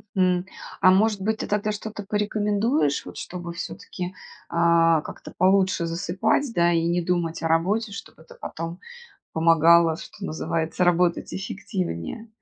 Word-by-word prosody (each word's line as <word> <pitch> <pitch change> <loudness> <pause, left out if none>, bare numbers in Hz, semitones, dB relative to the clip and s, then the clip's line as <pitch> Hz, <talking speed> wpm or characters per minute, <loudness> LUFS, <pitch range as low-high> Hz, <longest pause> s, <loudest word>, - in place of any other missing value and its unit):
Мгм. 185 -1 +2 0.4
А 185 - +7
может 205 +1 +3
быть, 220 +3 0
ты - - -3
тогда, 210 +1 0
что-то, 210 0 -6
порекомендуешь, 210 - 0
вот, - - -10
чтобы, 175 -1 -6
всё-таки, 180 +1 -6 0.4
а, 170 -1 +4
как-то - - -10
получше 190 -1 +3
засыпать, 190 +10 0
да, 170 0 +4
и 165 -1 +1
не 175 +1 +1
думать 170 -1 -1
о - - +1
работе, 200 +7 +1
чтобы 200 -4 -10
это, 160 - -16
потом 165 +2 -6 0.5
помогало, 165 0 +5
что 195 +3 -9
называется, 165 +1 -2
работать 175 0 +2
эффективнее? 190 - -4
180 Hz, 140 wpm, -24 LUFS, 165-205 Hz, 0.5 s, А